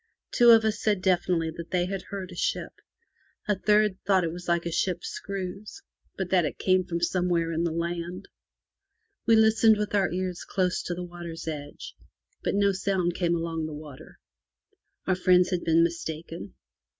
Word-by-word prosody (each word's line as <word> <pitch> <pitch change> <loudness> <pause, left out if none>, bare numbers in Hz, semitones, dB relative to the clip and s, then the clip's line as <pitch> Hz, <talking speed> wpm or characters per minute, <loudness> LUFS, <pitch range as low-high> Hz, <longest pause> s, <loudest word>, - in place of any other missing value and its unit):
Two 240 -1 +5
of 225 -1 +7
us 215 -1 0
said 210 -3 +1
definitely 175 -3 +1
that 170 +1 -9
they 180 -1 +1
had 195 0 -4
heard 195 -2 -6
a - - -9
ship; - - -2 0.8
a 205 - +2
third 210 0 +2
thought 195 -2 +3
that 170 - -1
it - - -7
was 175 0 -9
like 170 0 +1
a 170 - -2
ship's 175 +1 -1
screws, 195 +1 -6 0.3
but 190 -2 -3
that 180 -2 +4
it 150 - -3
came 185 -1 +2
from 170 -1 -3
somewhere 175 -1 +1
in 165 +1 0
the 170 - 0
land. 170 +3 -4 1.0
We 230 - +6
listened 220 0 +5
with 210 0 -3
our 200 -2 +2
ears 180 0 -3
close 185 -1 0
to 175 - -2
the 180 - -5
water's 170 -2 -8
edge, 145 -2 -6 0.5
but - - -1
no 200 0 +3
sound 190 -2 0
came 170 -1 0
along 165 -1 -3
the 155 - -7
water. 150 -3 -11 0.9
Our 190 - +2
friends 180 0 +3
had 180 -2 -1
been 165 0 +4
mistaken. 165 - -4
180 Hz, 185 wpm, -27 LUFS, 170-195 Hz, 1.0 s, of